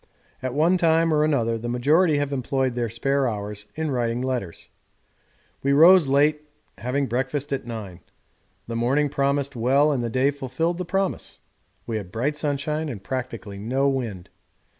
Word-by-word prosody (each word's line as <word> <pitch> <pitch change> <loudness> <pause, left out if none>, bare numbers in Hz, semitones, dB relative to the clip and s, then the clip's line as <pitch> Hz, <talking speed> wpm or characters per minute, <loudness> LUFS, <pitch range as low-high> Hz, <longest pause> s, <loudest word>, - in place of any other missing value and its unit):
At 130 0 -3
one 165 +5 +3
time 165 -1 +3
or 150 0 +3
another 115 -7 +1
the 120 +2 -4
majority 150 +7 +3
have 145 0 -1
employed 130 -1 -1
their 120 -1 -2
spare 135 +4 0
hours 105 -1 -5
in 160 -1 -2
writing 120 -2 -1
letters. 125 -10 -4 0.9
We 140 +1 +2
rose 165 +2 +7
late, 150 +2 +2 0.3
having 135 +4 -1
breakfast 135 +3 -2
at 130 -3 -3
nine. 105 -7 -7 0.7
The 115 - -5
morning 135 +6 +1
promised 140 0 0
well 135 +6 +3
and 135 -4 0
the 120 - -2
day 130 +4 +2
fulfilled 145 +6 -2
the 180 - -3
promise: 195 +2 -2 0.5
we 115 - -2
had 95 -4 -7
bright 135 +8 -1
sunshine 150 +1 -2
and 105 -7 -7
practically 115 -5 -5
no 130 +6 0
wind. 115 -10 -4
135 Hz, 160 wpm, -24 LUFS, 120-150 Hz, 0.9 s, rose